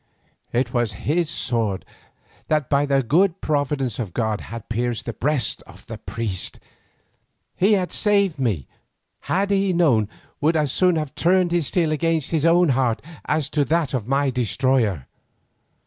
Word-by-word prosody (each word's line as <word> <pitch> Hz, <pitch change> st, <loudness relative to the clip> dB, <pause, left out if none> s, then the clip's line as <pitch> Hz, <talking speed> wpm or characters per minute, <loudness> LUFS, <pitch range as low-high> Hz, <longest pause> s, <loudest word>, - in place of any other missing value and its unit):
It 120 Hz, 0 st, 0 dB
was 120 Hz, -4 st, 0 dB
his 165 Hz, +2 st, +1 dB
sword 115 Hz, -, -1 dB, 0.6 s
that 155 Hz, -3 st, 0 dB
by 145 Hz, +1 st, +3 dB
the 135 Hz, -1 st, +2 dB
good 175 Hz, -, +2 dB
providence 145 Hz, -5 st, -1 dB
of 105 Hz, -8 st, -5 dB
God 110 Hz, -3 st, -1 dB
had 115 Hz, 0 st, -8 dB
pierced 120 Hz, 0 st, -2 dB
the 120 Hz, -, -4 dB
breast 140 Hz, -3 st, -1 dB
of -, -, -15 dB
the -, -, -8 dB
priest. 105 Hz, -6 st, -4 dB, 1.0 s
He 200 Hz, +4 st, +3 dB
had 185 Hz, -3 st, 0 dB
saved 200 Hz, -7 st, +2 dB
me 105 Hz, -, 0 dB
who, -, -, -37 dB, 0.6 s
had 200 Hz, +2 st, +1 dB
he 195 Hz, -1 st, +2 dB
known, 130 Hz, -, +3 dB, 0.3 s
would 160 Hz, +3 st, +2 dB
as 150 Hz, -4 st, +1 dB
soon 180 Hz, +2 st, +3 dB
have 155 Hz, -3 st, -3 dB
turned 175 Hz, +3 st, +2 dB
his 170 Hz, -5 st, +1 dB
steel 165 Hz, -4 st, +1 dB
against 160 Hz, 0 st, 0 dB
his 160 Hz, -1 st, +2 dB
own 175 Hz, 0 st, +4 dB
heart 125 Hz, -3 st, +1 dB, 0.2 s
as 155 Hz, -2 st, -1 dB
on 145 Hz, -2 st, +3 dB
that 160 Hz, 0 st, 0 dB
of 120 Hz, -5 st, -2 dB
my 135 Hz, +1 st, +1 dB
destroyer. 120 Hz, -, +1 dB
140 Hz, 165 wpm, -22 LUFS, 120-165 Hz, 1.0 s, own